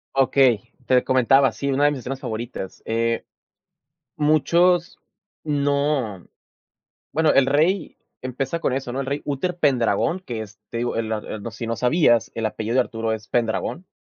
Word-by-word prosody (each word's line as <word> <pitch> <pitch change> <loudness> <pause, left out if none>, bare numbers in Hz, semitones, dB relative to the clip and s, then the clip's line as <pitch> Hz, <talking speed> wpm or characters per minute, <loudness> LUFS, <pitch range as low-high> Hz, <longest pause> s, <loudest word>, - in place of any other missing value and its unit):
Okey, 130 -5 +3
te 125 -1 +4
comentaba, 130 +1 +4
sí, 140 0 -2
una 140 +2 +2
de 145 - +4
mis 140 - -4
escenas 135 +2 -5
favoritas. 110 -5 -6
Eh, 115 +1 -1 0.9
muchos 170 +4 +2 0.4
No 140 - 0 0.9
Bueno, 160 0 +3
el 135 - +4
rey, 160 +7 +1 0.2
empieza 135 +5 -3
con 130 - 0
eso, 130 -2 -3
¿no? 135 - -2
El 135 - -4
rey, 140 +2 -2
Uter 150 +5 -2
Pendragón 135 - +1
que 120 -11 -5
es, 105 0 -12
te - - -7
digo, 120 +1 -2
el, 115 -1 -2
ah, 105 - -2
el 110 - -6
no, 115 - -5
si 115 +1 -6
no 115 0 -2
sabías 125 -3 +3
el 115 - -3
apellido 110 +2 -2
de 130 - +5
Arturo 115 -2 -2
es 110 -1 -8
Pendragón. 120 +9 -1
130 Hz, 170 wpm, -23 LUFS, 115-145 Hz, 0.9 s, de